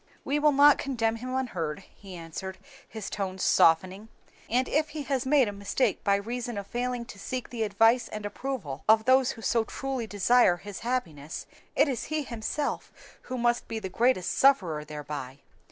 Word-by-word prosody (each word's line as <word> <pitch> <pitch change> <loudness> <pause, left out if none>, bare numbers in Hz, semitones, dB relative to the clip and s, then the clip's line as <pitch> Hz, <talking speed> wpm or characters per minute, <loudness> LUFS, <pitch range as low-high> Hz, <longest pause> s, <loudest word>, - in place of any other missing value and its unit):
"We 285 +2 +1
will 300 0 +4
not 285 +1 +6
condemn 230 -5 -1
him 255 +2 -5
unheard," 185 -10 -3
he 195 -3 -11
answered, 175 +3 -7 0.3
his 220 -1 -6
tones 190 -2 -3
softening, 185 +6 +3 0.4
"and 250 +3 +2
if 305 +1 +1
he 300 -1 -5
has 265 -2 -1
made 270 -3 +4
a - - -2
mistake 200 +3 -1
by 200 - +3
reason 235 +3 -4
of 200 - -4
failing 245 +2 -3
to 205 - -11
seek 255 +4 -5
the 235 -2 -4
advice 225 +3 +3
and 215 -1 -6
approval 205 - -5
of 220 0 +6
those 260 0 +4
who 225 - -12
so 230 -1 +2
truly 265 0 -4
desire 205 -1 +4
his 205 +1 -8
happiness, 170 - -3 0.3
it - - +4
is 260 -5 -2
he 310 -1 -2
himself 245 +4 -3 0.4
who 255 - -3
must 240 0 +1
be 225 - -4
the 195 -4 -5
greatest 230 -3 +1
sufferer 185 - +3
thereby." 145 -3 -7
225 Hz, 180 wpm, -28 LUFS, 190-255 Hz, 0.4 s, not